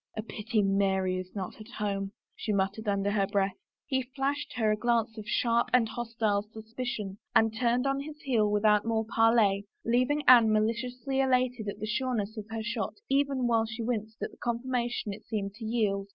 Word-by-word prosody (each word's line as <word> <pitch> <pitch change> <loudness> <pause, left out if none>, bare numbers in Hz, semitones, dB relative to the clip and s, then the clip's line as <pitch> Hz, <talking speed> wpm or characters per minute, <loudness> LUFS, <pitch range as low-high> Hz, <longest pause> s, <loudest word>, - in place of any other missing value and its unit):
" - - -20
A 215 - -2
pity 215 -1 -1
Mary 190 -2 +1
is 185 +2 -9
not 195 +1 -5
at 215 - -10
home," 195 -2 -2 0.2
she 215 - -3
muttered 200 +2 -1
under 200 0 +1
her 200 -2 +1
breath. 200 -1 0 0.3
He 265 -2 0
flashed 285 +2 -1
her 220 -3 +1
a - - +3
glance 230 0 +1
of 215 -2 -8
sharp 235 -1 +2
and 245 -3 +5
hostile 225 -3 -1
suspicion 220 -1 -6 0.2
and 225 0 +4
turned 245 +2 +1
on 275 0 +1
his 300 +1 -7
heel 225 -6 +2
without 210 0 +3
more 225 -1 0
parley, 225 -3 +3 0.2
leaving 255 +6 +2
Anne 235 -4 +8
maliciously 240 +4 0
elated 250 -4 +1
at 200 - -4
the 215 - -3
sureness 220 -2 -1
of 215 -2 -7
her 225 0 -4
shot 230 0 -3
even 275 -2 +2
while 225 -2 +2
she 230 +1 -5
winced 220 -2 -3
at - - -3
the - - -18
confirmation 240 -2 -2
it 215 - -12
seemed 200 -3 -3
to 220 +2 -8
yield. 210 -3 0
225 Hz, 195 wpm, -29 LUFS, 205-245 Hz, 0.3 s, Anne